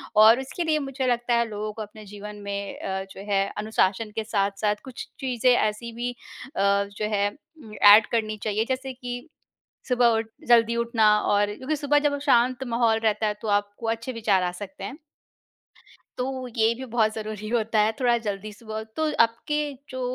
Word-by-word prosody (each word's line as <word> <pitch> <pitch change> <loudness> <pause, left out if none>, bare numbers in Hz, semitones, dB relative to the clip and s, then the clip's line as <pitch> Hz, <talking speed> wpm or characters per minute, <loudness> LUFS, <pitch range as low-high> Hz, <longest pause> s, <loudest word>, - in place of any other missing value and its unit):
और 220 +4 +8
इसके 270 +6 -4
लिए 310 -2 +1
मुझे 270 -2 -3
लगता 240 0 +1
है 235 0 +2
लोगों 210 0 -4
को 220 - -7
अपने 210 0 -9
जीवन 210 +1 -9
में 200 0 -4
अ, 190 0 -3
जो 195 - -10
है 195 0 +3 0.2
अनुशासन 210 0 0
के 220 - -1
साथ-साथ 205 -1 0
कुछ 260 -2 -8
चीज़ें 255 -1 +2
ऐसी 215 +2 -1
भी 245 +1 -2
अ, - - -13 0.8
जो 210 - -2
है 200 0 +2 0.3
उम, 215 -1 -12
एड 210 +1 +8
करनी 215 -2 -1
चाहिए 215 +1 0
जैसे 260 0 -2
कि 245 +3 -7 0.6
सुबह 245 -1 +4
उठ 225 - -2 0.2
जल्दी 235 -1 +5
उठना 225 -3 +3
और 205 0 +1
क्योंकि 300 +4 -2
सुबह 290 +1 +2
जब 290 -1 +1
शांत 255 -1 +3
माहौल 230 -1 +2
रहता 215 0 +2
है 210 - 0
तो 220 - -4
आपको 205 +2 -1
अच्छे 230 +3 -3
विचार 210 -5 +1
आ 180 - 0
सकते 195 +1 -8
हैं। 260 - -6 1.2
तो 255 0 -3
ये 225 +1 +4
भी 260 +2 -7
बहुत 220 -2 +1
ज़रूरी 215 -1 -5
होता 225 -2 +1
है 215 +1 +4
थोड़ा 240 -2 +3
जल्दी 205 +1 -4
सुबह 220 0 -6
तो 315 -1 0
आपके 265 +6 -1 0.3
जो 260 0 -5
225 Hz, 185 wpm, -25 LUFS, 210-245 Hz, 1.2 s, और